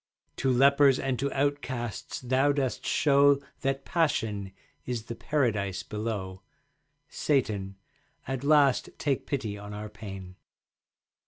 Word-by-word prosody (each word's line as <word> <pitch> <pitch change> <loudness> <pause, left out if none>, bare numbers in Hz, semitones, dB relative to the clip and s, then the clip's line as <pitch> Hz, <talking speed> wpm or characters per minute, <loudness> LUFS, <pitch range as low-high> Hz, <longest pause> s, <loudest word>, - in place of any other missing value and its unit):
To 130 - +1
lepers 140 +1 +5
and 130 -3 -2
to 140 +1 -1
outcasts 135 -4 -2
thou 130 +3 +2
dost 135 -3 -2
show 140 -1 +4 0.2
That 135 0 -2
Passion 110 - 0 0.3
is 120 -3 -3
the 120 - -6
Paradise 105 -8 -1
below. 105 -3 -4 0.7
Satan, 105 -9 -1 0.5
at 135 0 -3
last 145 -2 +4
take 140 -3 -1
pity 110 -7 -3
on 105 0 -8
our 105 +1 -6
pain. 95 -4 -9
125 Hz, 115 wpm, -28 LUFS, 105-140 Hz, 0.7 s, lepers